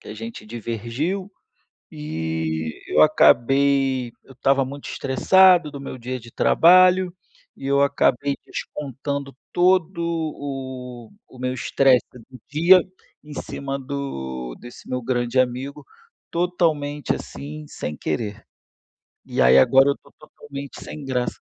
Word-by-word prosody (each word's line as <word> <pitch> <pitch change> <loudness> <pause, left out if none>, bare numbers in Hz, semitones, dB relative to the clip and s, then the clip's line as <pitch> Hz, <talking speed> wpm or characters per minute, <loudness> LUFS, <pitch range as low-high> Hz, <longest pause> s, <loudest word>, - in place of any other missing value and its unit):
que - - -14
a - - -7
gente 115 +1 -8
divergiu, 120 - -4 0.6
e 80 +1 -4
eu 75 - +3
acabei 135 - +3
eu 135 - -16
estava 135 +1 +2
muito 140 +2 -8
estressado 175 +5 +4
do 140 - -8
meu 135 -1 -7
dia 130 +2 -4
de 115 0 -14
trabalho 185 +4 +5 0.4
e 135 - -7
eu 140 0 +3
acabei 140 0 +2
descontando 140 -1 -5 0.2
todo 180 0 +2
o 135 -7 -5 0.2
o 130 - -15
meu 125 0 -2
estresse 130 -1 +3
do 125 +1 -14
dia 170 +5 +6 0.4
em 150 0 -11
cima 140 -1 -5
do 65 - -5
desse 120 - -13
meu 125 0 -2
grande 120 +1 0
amigo, 130 +2 -2 0.5
totalmente, 160 -5 0
assim, 75 +2 -8
sem 75 +1 -6
querer, 100 +8 -4 0.8
e - - -3
aí 65 +1 +6
agora 135 - +6
eu - - 0
estou - - -22
totalmente 140 -2 -10
sem 150 - -8
graça. 125 -2 -2
135 Hz, 130 wpm, -22 LUFS, 120-145 Hz, 0.8 s, dia